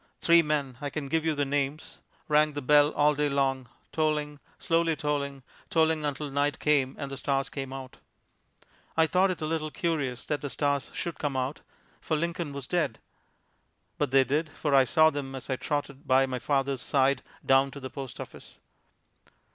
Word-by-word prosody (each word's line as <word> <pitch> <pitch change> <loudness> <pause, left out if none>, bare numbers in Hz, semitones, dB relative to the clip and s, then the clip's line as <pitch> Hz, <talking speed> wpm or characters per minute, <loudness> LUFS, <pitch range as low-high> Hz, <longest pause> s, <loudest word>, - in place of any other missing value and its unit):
Three 170 0 +6
men 145 -5 -2
I 145 - -2
can 140 -1 -5
give 160 +2 +1
you 160 -1 +1
their 145 0 0
names 140 +2 -2 0.3
rang 150 0 +3
the 145 - -4
bell 145 +2 +5
all 150 +1 +4
day 145 0 0
long, 135 -3 0 0.2
tolling, 150 -2 -1 0.2
slowly 165 -1 +1
tolling, 140 -2 -2 0.3
tolling 160 -1 +2
until 145 0 -3
night 145 +1 +1
came 140 -3 +2
and 140 -2 -5
the 135 - -5
stars 135 0 0
came 135 -2 -5
out. 135 -1 -8 1.0
I 160 - +6
thought 185 +4 +3
it 175 -3 -3
a - - 0
little 155 0 -2
curious 145 -7 -2
that 150 - -2
the 145 - -4
stars 140 -1 -1
should 170 - -4
come 145 -3 -1
out, 130 +3 -2 0.4
for 155 - -1
Lincoln 170 -1 -2
was 140 -2 -5
dead; 155 -9 0 1.0
but 145 - +1
they 135 +1 +5
did, 150 +4 -1
for 145 -1 -2
I 135 -1 +6
saw 155 +5 +5
them 135 -2 -5
as 130 0 -6
I - - +2
trotted 145 0 -4
by 130 +1 +5
my 130 -1 -3
father's 135 -1 0
side 140 0 +2 0.2
down 135 +1 +4
to 140 - -9
the 130 -1 -7
post 135 -3 -7
office. - - -10
145 Hz, 185 wpm, -28 LUFS, 135-155 Hz, 1.0 s, Three